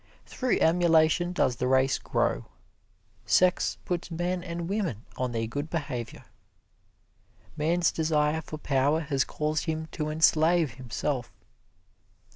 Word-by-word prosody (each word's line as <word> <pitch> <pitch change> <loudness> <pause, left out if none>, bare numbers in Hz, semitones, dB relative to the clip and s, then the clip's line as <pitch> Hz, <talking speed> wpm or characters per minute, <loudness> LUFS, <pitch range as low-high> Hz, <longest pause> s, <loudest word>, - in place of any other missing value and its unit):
Through 255 -1 -1
emulation 165 0 +3
does 130 -9 +1
the 125 - -1
race 130 +1 +3
grow. - - -1 0.8
Sex 180 0 +3
puts 175 -1 -3
men 175 +2 -2
and 170 -1 -5
women 180 - -2
on 125 -1 -2
their 115 -1 -1
good 145 +7 -4
behavior. 140 -8 -5 1.3
Man's 165 +3 +1
desire 155 -1 +1
for 155 - -8
power 145 +2 +1
has 140 -3 0
caused 150 0 -2
him 160 -1 -2
to 155 -1 -3
enslave 160 -1 +3
himself. 130 +1 -3
155 Hz, 120 wpm, -27 LUFS, 135-170 Hz, 1.3 s, emulation